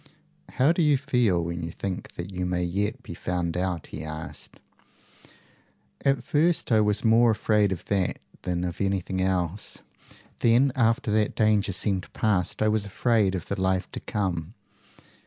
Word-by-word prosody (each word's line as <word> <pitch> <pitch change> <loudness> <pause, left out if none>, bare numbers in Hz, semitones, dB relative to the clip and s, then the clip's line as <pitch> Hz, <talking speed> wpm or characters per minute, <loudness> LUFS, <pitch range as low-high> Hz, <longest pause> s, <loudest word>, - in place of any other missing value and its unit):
"How 135 +5 +4
do 170 - +1
you 150 -3 +4
feel 120 -10 +1
when 85 +1 -4
you 85 - -4
think 95 +2 -5
that 85 +3 -6
you 90 -1 -3
may 90 0 0
yet 105 +8 -2
be 85 - -8
found 85 0 -2
out?" 90 -2 -2
he 75 - -5
asked. 80 0 -7 1.4
"At 135 -3 +2
first 155 +2 +1
I 110 -1 +5
was 105 +1 +1
more 115 +1 +5
afraid 105 -2 +2
of 90 -3 -4
that 95 -3 0 0.2
than 90 -1 -2
of 90 +1 -4
anything 95 -1 -1
else. 95 0 -1 0.6
Then 120 +4 +4
after 115 0 +2
that 105 0 +1
danger 105 -2 +2
seemed 95 -1 -1
past, 105 -2 0
I - - +3
was 105 -1 +1
afraid 105 -2 +2
of 90 - -4
the 100 -1 -3
life 95 0 0
to - - -5
come. 90 -2 -3
100 Hz, 165 wpm, -26 LUFS, 90-115 Hz, 1.4 s, I